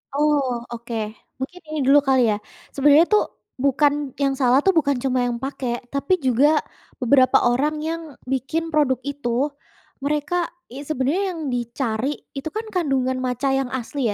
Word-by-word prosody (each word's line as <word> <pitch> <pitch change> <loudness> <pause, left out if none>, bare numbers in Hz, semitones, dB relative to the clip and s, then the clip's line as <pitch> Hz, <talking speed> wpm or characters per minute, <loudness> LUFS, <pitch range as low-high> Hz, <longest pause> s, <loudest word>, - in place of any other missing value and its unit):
Oh, 275 -5 +1
oke. 235 0 -7 0.4
Mungkin 355 +8 -6
ini 310 - -3
dulu 285 +2 +7
kali 265 -2 +3
ya, - - 0 0.4
sebenarnya 290 +4 +6
tuh 420 - +5 0.4
bukan 280 +1 +4 0.3
yang 275 -1 +2
salah 255 -1 +4
tuh 385 - +5
bukan 285 -3 +2
cuma 260 -1 +1
yang 240 -1 -1
pakai, 250 -2 -4
tapi 280 +6 +1
juga 255 +3 +4 0.5
beberapa 255 0 +5
orang 280 +6 +1
yang 330 +1 -2 0.3
bikin 270 +5 -1
produk 285 -5 +3
itu 285 -3 -3 0.8
mereka 300 +4 0 0.2
ya 275 - -6
sebenarnya 310 +6 0
yang - - -7
dicari 235 0 -2 0.3
itu 275 +3 -4
kan 445 - -3
kandungan 270 -7 0
matcha 250 +2 -1
yang 270 -2 -1
asli 260 +2 -4
275 Hz, 155 wpm, -22 LUFS, 255-295 Hz, 0.8 s, dulu